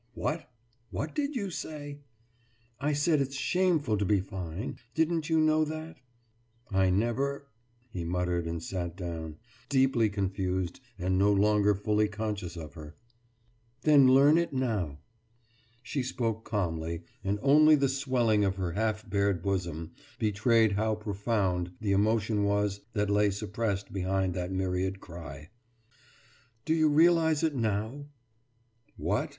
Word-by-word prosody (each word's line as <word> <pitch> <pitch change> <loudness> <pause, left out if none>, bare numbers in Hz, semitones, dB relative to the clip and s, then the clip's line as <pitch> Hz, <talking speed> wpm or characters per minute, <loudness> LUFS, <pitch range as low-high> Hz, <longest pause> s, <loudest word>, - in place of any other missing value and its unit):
»What 155 -3 -3 0.4
what 155 - -4
did 290 0 -2
you 200 -6 -2
say?« 145 -3 -6 0.8
»I 145 +2 0
said 145 +1 +2
it's 135 0 -3
shameful 155 - +1
to - - +1
be 100 0 +2
fine. 95 +2 -5 0.2
Didn't 160 0 +1
you 160 -1 +3
know 155 0 +4
that?« 155 +1 -6 0.7
»I 95 -1 +3
never 125 +8 0 0.2
« 120 +1 -38
he 90 - -3
muttered, 90 0 -1
and 85 0 -4
sat 85 -2 -4
down, 80 -4 -5 0.3
deeply 130 -5 +3
confused 95 -2 -2 0.2
and 95 0 0
no 100 +1 +4
longer 105 0 +3
fully 105 +2 +1
conscious 105 -4 -4
of 80 -3 -8
her. 75 -1 -10 0.9
»Then 145 -4 +6
learn 140 +5 +6
it 170 - -1
now.« 110 - -1 0.9
She 135 +3 -2
spoke 115 -3 -2
calmly, 85 -5 -2 0.2
and 100 +1 0
only 155 +3 +7
the 140 -1 +2
swelling 130 -6 +1
of 95 -1 +1
her 95 -3 -2
half 110 +3 -1
bared 100 -3 0
bosom 85 -4 -2 0.3
betrayed 110 +1 +3
how 110 +2 0
profound 100 -4 -1
the 105 -2 -1
emotion 105 +1 +2
was 100 0 0
that 105 -2 0
lay 105 0 +3
suppressed 100 0 -3
behind 95 -1 0
that 90 +1 -3
myriad 95 0 -1
cry. 80 -4 -10 1.1
»Do 160 - +2
you 155 -1 +3
realise 160 0 +4
it 160 -2 +2
now?« 110 +5 -2 0.9
»What? - - -1
105 Hz, 140 wpm, -29 LUFS, 95-135 Hz, 1.1 s, only